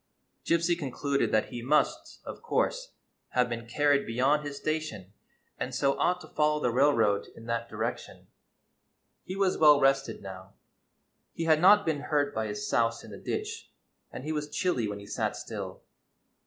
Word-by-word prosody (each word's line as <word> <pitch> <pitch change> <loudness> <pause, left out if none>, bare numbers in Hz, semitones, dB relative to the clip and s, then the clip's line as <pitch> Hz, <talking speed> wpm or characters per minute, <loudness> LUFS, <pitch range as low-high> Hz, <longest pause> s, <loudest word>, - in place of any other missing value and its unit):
Gypsy 170 +1 +2
concluded 140 -2 -1
that 110 - +1
he 120 - -6
must, 145 +5 0
of - - -8
course, - - -1 0.4
have 125 -1 +3
been 115 -1 -5
carried 145 +3 +2
beyond 135 +6 +2
his 145 -1 -6
station, 140 - -4 0.5
and 130 - -3
so 140 +1 +2
ought 180 0 +2
to 155 - -11
fol 150 -1 +1
low - - -2
the 125 - +2
railroad 115 -6 +3
in 115 - -12
that 115 0 -2
direction. 110 +2 -5 1.0
He 185 - -6
was 195 -1 +1
well 150 -2 +7
rested 135 -3 +1
now; 95 0 -9 0.8
he 165 - -3
had 160 -1 +3
not 205 +3 +7
been 160 -3 0
hurt 145 0 0
by 110 0 -2
his 105 0 -4
souse 115 0 +1
in - - -11
the - - -9
ditch, 435 +1 -4 0.4
and - - -7
he 155 - -3
was 150 -1 -3
chilly 150 -6 0
when 105 0 -4
he 100 - -10
sat - - -2
still. - - -7
140 Hz, 175 wpm, -29 LUFS, 115-155 Hz, 1.0 s, well